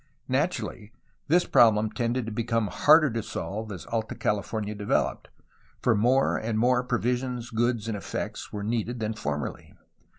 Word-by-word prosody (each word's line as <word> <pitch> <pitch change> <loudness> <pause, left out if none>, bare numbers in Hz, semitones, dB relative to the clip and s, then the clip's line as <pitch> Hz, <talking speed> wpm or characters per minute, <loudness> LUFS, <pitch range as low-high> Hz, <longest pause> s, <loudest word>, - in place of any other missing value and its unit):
Naturally, 105 +2 -2 0.3
this 175 +4 +4
problem 110 -2 +4
tended 120 +2 -1
to 115 - -5
become 115 -1 0
harder 150 - +5
to 115 0 -2
solve 105 +1 -5
as 90 -4 -7
Alta 110 -1 -3
Cah 105 -1 0
fomia 105 0 -4
developed, 105 0 -1 0.5
for 125 - +3
more 125 +6 +3
and 110 0 -2
more 125 +2 +3
provisions, 125 0 -2
goods, 115 -1 0
and 110 - -2
effects 100 - -5
were 105 -1 -4
needed 115 +2 -2
than 110 0 -1
formerly. 75 -9 -5
115 Hz, 155 wpm, -27 LUFS, 105-120 Hz, 0.5 s, harder